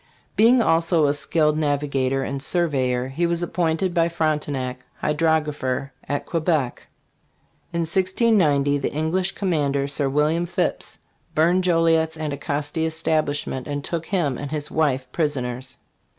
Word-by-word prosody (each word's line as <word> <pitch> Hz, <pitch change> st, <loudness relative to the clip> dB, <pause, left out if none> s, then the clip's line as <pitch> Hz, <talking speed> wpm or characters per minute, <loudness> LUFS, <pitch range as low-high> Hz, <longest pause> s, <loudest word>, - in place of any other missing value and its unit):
Being 235 Hz, +2 st, +5 dB
also 165 Hz, -1 st, +3 dB
a 140 Hz, -, +3 dB
skilled 150 Hz, +1 st, +1 dB
navigator 140 Hz, -3 st, 0 dB
and 140 Hz, 0 st, -4 dB
surveyor, 130 Hz, -7 st, 0 dB
he 165 Hz, +6 st, 0 dB
was 170 Hz, 0 st, -1 dB
appointed 170 Hz, +1 st, 0 dB
by 170 Hz, -1 st, +2 dB
Frontenac 150 Hz, -6 st, -1 dB, 0.2 s
hydrographer 150 Hz, -4 st, 0 dB, 0.2 s
at 145 Hz, -, -2 dB
Quebec. 160 Hz, -6 st, -1 dB, 0.8 s
In 170 Hz, 0 st, -1 dB
1690 170 Hz, -, +2 dB
the 135 Hz, -, -2 dB
English 175 Hz, +5 st, -1 dB
commander, 145 Hz, -7 st, 0 dB
Sir 140 Hz, -1 st, 0 dB
William 155 Hz, +5 st, +1 dB
Phipps, -, -, -2 dB, 0.4 s
burned 175 Hz, +4 st, +3 dB
Joliet's 165 Hz, -2 st, +2 dB
Anticosti 145 Hz, +1 st, -2 dB
establishment 155 Hz, -4 st, -1 dB
and 145 Hz, -1 st, -3 dB
took 165 Hz, +1 st, -3 dB
him 155 Hz, -10 st, 0 dB
and 145 Hz, -, -5 dB
his 150 Hz, 0 st, -4 dB
wife 135 Hz, -5 st, +1 dB
prisoners. 130 Hz, -5 st, -2 dB
155 Hz, 125 wpm, -23 LUFS, 140-165 Hz, 0.8 s, Being